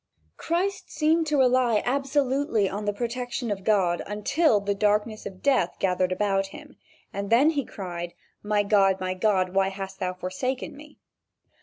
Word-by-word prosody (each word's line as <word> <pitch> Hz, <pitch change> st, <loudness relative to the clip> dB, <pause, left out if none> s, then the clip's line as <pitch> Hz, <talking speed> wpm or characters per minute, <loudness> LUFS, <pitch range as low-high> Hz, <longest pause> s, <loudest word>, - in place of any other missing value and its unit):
Christ 370 Hz, +4 st, -2 dB
seemed 320 Hz, +1 st, +1 dB
to 300 Hz, -1 st, +1 dB
rely 250 Hz, -4 st, +3 dB
absolutely 270 Hz, -4 st, +1 dB
on 205 Hz, +2 st, -4 dB
the 205 Hz, -, +1 dB
protection 240 Hz, +2 st, -3 dB
of 195 Hz, -2 st, -3 dB
God 190 Hz, -5 st, +2 dB
until 215 Hz, -, +2 dB
the 200 Hz, 0 st, -1 dB
darkness 210 Hz, +2 st, 0 dB
of 185 Hz, -1 st, -11 dB
death 260 Hz, -11 st, +2 dB
gathered 185 Hz, -1 st, 0 dB
about 195 Hz, 0 st, 0 dB
him, -, -, -12 dB, 0.4 s
and 200 Hz, 0 st, -4 dB
then 270 Hz, +7 st, +5 dB
he 290 Hz, -3 st, -1 dB
cried: 175 Hz, -5 st, -6 dB, 0.3 s
"My 210 Hz, 0 st, +1 dB
God! 195 Hz, -2 st, +3 dB
my 185 Hz, 0 st, -2 dB
God! 185 Hz, -2 st, +1 dB
why 195 Hz, 0 st, +3 dB
hast 195 Hz, 0 st, -7 dB
thou 185 Hz, 0 st, -2 dB
forsaken 245 Hz, +11 st, -4 dB
me?" 300 Hz, +1 st, -14 dB
210 Hz, 160 wpm, -26 LUFS, 195-260 Hz, 0.4 s, then